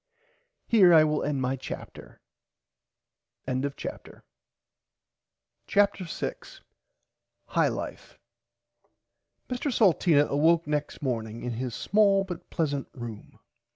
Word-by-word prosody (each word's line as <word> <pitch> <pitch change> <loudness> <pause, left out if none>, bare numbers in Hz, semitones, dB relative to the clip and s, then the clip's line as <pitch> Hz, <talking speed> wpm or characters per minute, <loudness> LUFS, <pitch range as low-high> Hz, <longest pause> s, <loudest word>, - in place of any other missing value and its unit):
Here 190 -7 +6
I 155 - +8
will 150 -1 0
end 140 -3 -1
my 130 +1 0
chapter. 130 - -9 1.2
[Pg 130 0 -1 0.2
59] - - -8 1.4
CHAPTER 200 -3 +2
6 - - -6 0.9
HIGH - - +2
LIFE - - -7 1.3
Mr 255 +3 -2
Salteena 170 - +4
awoke 160 +4 +3
next 150 0 -3
morning 115 -3 -3
in 125 - -3
his 120 0 -4
small 200 -1 +3
but 180 -3 -8
pleasant 145 -4 -2
room. 115 -4 -9
150 Hz, 100 wpm, -27 LUFS, 130-195 Hz, 1.4 s, I